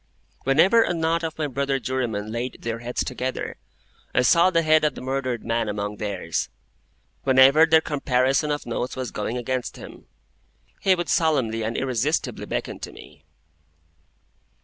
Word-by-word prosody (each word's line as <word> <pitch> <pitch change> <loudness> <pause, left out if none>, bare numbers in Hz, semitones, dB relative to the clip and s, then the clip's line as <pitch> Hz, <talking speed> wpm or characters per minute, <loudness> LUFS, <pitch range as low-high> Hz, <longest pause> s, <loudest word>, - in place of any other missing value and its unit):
Whenever 170 - +5
a 180 - +1
knot 165 +1 0
of 160 -1 -4
my 155 - -1
brother 140 0 -1
jurymen 115 -6 -3
laid 120 +3 -4
their 115 0 -3
heads 120 +1 -2
together, 130 0 -4 0.6
I 125 - +4
saw 170 +7 +5
the 165 -2 +2
head 155 0 +4
of 150 - +1
the - - -8
murdered 130 -3 -3
man 115 -1 0
among 105 0 -3
theirs. 100 -6 -3 0.7
Whenever 135 +4 +6
their 160 0 +5
comparison 135 -1 +1
of 145 0 -2
notes 120 +1 -3
was 130 -2 -4
going 110 +3 -3
against 125 +1 -3
him, - - -12 0.7
he 190 -1 +3
would 175 -1 -3
solemnly 130 -9 +1
and 110 +1 -2
irresistibly 135 +4 -1
beckon - - -4
to - - -7
me. - - -15
130 Hz, 155 wpm, -24 LUFS, 120-155 Hz, 0.7 s, Whenever